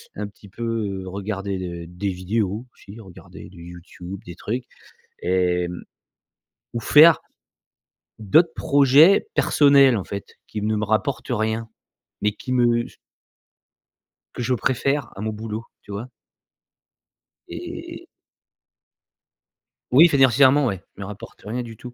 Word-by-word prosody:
un 105 0 -4
petit 100 0 -17
peu, 115 +4 -8
heu, 100 -5 -3
regarder 100 0 -4
de 85 -2 -6
des 90 +3 -4
vidéos, 100 +4 -2
aussi 100 +3 -14
regarder 95 -5 -13
du 85 -3 -13
YouTube, 90 +2 -10
des 85 -1 -9
trucs, 120 +4 -4 0.6
et 90 -1 +1
mmh, 90 0 -7 0.9
ou 115 - -2
faire 155 +8 +7 1.0
d'autres 155 - +4
projets 145 - +5
personnels 140 -4 +5
en 95 - -3
fait, 100 0 -6 0.2
qui 105 - -5
ne 110 +1 0
me 105 - -1
rapportent 110 +5 -1
rien, 110 0 -1 0.5
mais 105 - +2
qui 130 - -8
me 120 -1 +2
s - - -15 1.4
Que 120 - -4
je 130 - 0
préfère 130 +3 -1
à 100 - -8
mon 110 +1 -2
boulot, 110 +1 -6 0.2
tu 100 - -10
vois? 110 +5 -5 1.4
Et - - -8 1.9
Oui 155 +7 +8
financièrement, 135 +1 +5
ouais, 95 -6 -2 0.2
me 100 - -6
rapportent 100 +1 -11
rien 120 +4 -3
du 115 -2 -9
tout. 125 +1 -10
110 Hz, 135 wpm, -22 LUFS, 95-125 Hz, 1.9 s, Oui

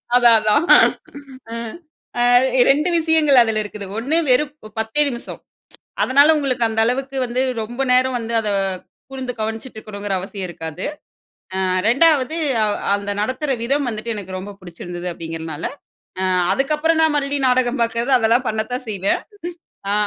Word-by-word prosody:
அதான், 240 -2 +6
அதான். 215 +9 +2 0.9
ம், 230 -1 -6 0.4
அ - - +2 0.5
2 300 +5 +3
விஷயங்கள் 315 -5 +4
அதில 225 -2 0
இருக்குது. 205 -1 -8
1 275 +8 0
வெறும் 285 +4 +3 0.3
10தே 220 +7 0
நிமிஷம். 240 -3 -7 0.6
அதனால 285 +4 +5
உங்களுக்கு 265 -5 0
அந்த 225 0 -1
அளவுக்கு 270 +3 -2
வந்து 245 +1 -2 0.2
ரொம்ப 240 +5 -4
நேரம் 255 0 +3
வந்து 230 0 -5
அத 215 - -3 0.6
கூர்ந்து 260 -2 -5
கவனிச்சிட்ருக்கணுங்குற 215 -2 -5
அவசியம் 190 +1 -6
இருக்காது. 160 0 -7 0.8
அ - - +1 0.3
2ஆவது 285 +2 +3 0.3
அவ் 210 -1 0 0.2
அந்த 200 0 -5
நடத்துற 255 +7 -2
விதம் 275 +4 0
வந்துட்டு 230 0 -4
எனக்கு 190 -2 -6
ரொம்ப 195 +2 -7
புடிச்சிருந்தது 175 0 -7
அப்டீங்கிறதுனால, 165 -2 -6 0.5
அ - - 0 0.3
அதுக்கப்பறம் 305 +4 +1
நான் 315 -1 +3
மறுபடியும் 280 -1 0
நாடகம் 250 0 +1
பாக்குறது 235 +3 -1
அதெல்லாம் 235 +2 +2
பண்ணத்தான் 220 +4 -3
செய்வேன். 200 -2 0 0.7
ஆ - - 0
235 Hz, 140 wpm, -20 LUFS, 210-270 Hz, 0.9 s, அதான்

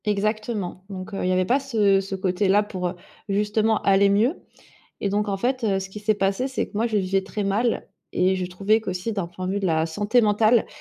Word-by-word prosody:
Exactement 210 -2 -2
donc 190 +1 -7
heu, 195 - -3
il 180 - +1
y - - +2
avait 185 0 +2
pas 255 +8 +2
ce 210 -8 +2
ce 195 0 -5
côté-là 190 +2 +2
pour, 185 -3 -3
heu, 175 - -4 0.3
justement 210 +2 +1
aller 200 0 +4
mieux 220 - +3 0.7
et 200 - 0
donc 205 +2 0
en 200 - 0
fait, 250 +4 -1
heu, 195 -3 +1
ce 190 - -6
qui 210 - -8
s'est 215 +1 +1
passé, 195 +5 0
c'est 265 -1 -2
que, - - -23
moi, 220 +3 +1
je 225 - -4
le 200 - +2
vivais 190 +1 0
très 205 +2 -4
mal 210 +4 0 0.2
et 185 +1 +2
je 185 -1 -2
trouvais 195 +5 +1
qu'aussi 190 +1 -3
d'un 195 -4 -2
point 185 +2 -6
de - - -1
vue 200 - -1
de 195 - 0
la 160 -2 +1
santé 205 +8 +2
mentale 215 +1 +3
200 Hz, 245 wpm, -24 LUFS, 190-215 Hz, 0.7 s, aller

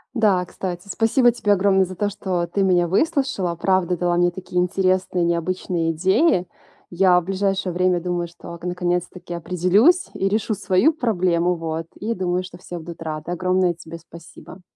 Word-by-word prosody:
Да, 200 -6 +2
кстати. 180 +1 -6
Спасибо 235 +4 +3
тебе 210 -3 +1
огромное 190 -1 +3
за 185 +1 -9
то, 205 +2 -1
что 185 -4 -2
ты 195 +3 -2
меня 180 -2 +3
выслушала. 260 - 0
Правда 180 0 +1
дала 175 0 0
мне 175 0 +3
такие 180 0 -3
интересные 185 -1 +1
и - - +2
необычные 170 -1 -1
идеи. 185 - +2 0.4
Я 180 0 +4
в - - -8
ближайшее 195 -1 -1
время 180 0 +2
думаю, 175 0 -2
что 170 0 -11
ак 170 - -11
наконец-таки 180 0 -3
определюсь 185 - +2
и 195 - -1
решу 215 +1 0
свою 205 - +2
проблему. 180 - +1
Вот. 165 0 -4
И 220 +3 -3
думаю, 180 -2 -1
что 180 -1 -11
все 175 - -8
будут 170 0 -9
рады. 155 +1 -5
Огромное 185 0 +1
тебе 165 0 -10
спасибо. 170 +2 -14
180 Hz, 170 wpm, -22 LUFS, 175-195 Hz, 0.4 s, Я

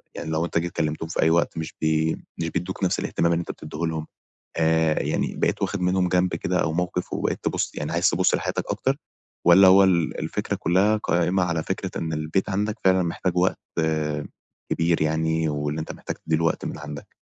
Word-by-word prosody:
يعني 80 - -5
لو 80 +1 0
أنت 85 - -2
جيت 85 +1 -3
كلمتهم 80 +1 -2
في - - -1
أي 80 - +4
وقت، 85 0 +1
مش 80 -1 -4
بي 80 0 +1 0.2
مش 85 0 -1
بيدّوك 95 +3 -4
نفس 90 - +1
الاهتمام 85 0 +1
اللي 85 - +1
أنت - - -5
بتديه 75 0 -9
لهم؟ 80 -1 -3 0.5
آآ، 80 -1 +2
يعني - - -1
بقيت - - 0
واخد 100 - -1
منهم 90 0 +2
جنب 90 -1 +2
كده 90 +2 -1
أو 80 - -1
موقف، 90 +1 -2
وبقيت - - -1
تبص - - -1
يعني - - -3
عايز - - +3
تبص - - +2
لحياتك - - -2
أكتر، 135 +1 0 0.5
والّا 95 +2 +8
هو 95 +1 +8
ال 85 -4 +2
الفكرة - - -2
كلها 95 +5 +2
قائمة 90 -2 +1
على 85 -2 -1
فكرة - - -3
إن 80 -1 -3
البيت 80 +5 -1
عندك 105 +2 -1
فعلًا 95 -1 +5
محتاج 90 +1 -2
وقت 90 +1 +2 1.1
كبير 80 0 +1
يعني، 80 +1 +1
وإن 75 +1 -2
أنت 80 - -4
محتاج - - -6
تدِّي 80 - -1
له 80 - -1
وقت 80 - 0
من - - -5
عندك؟ 75 -1 -9
85 Hz, 200 wpm, -24 LUFS, 80-90 Hz, 1.1 s, والّا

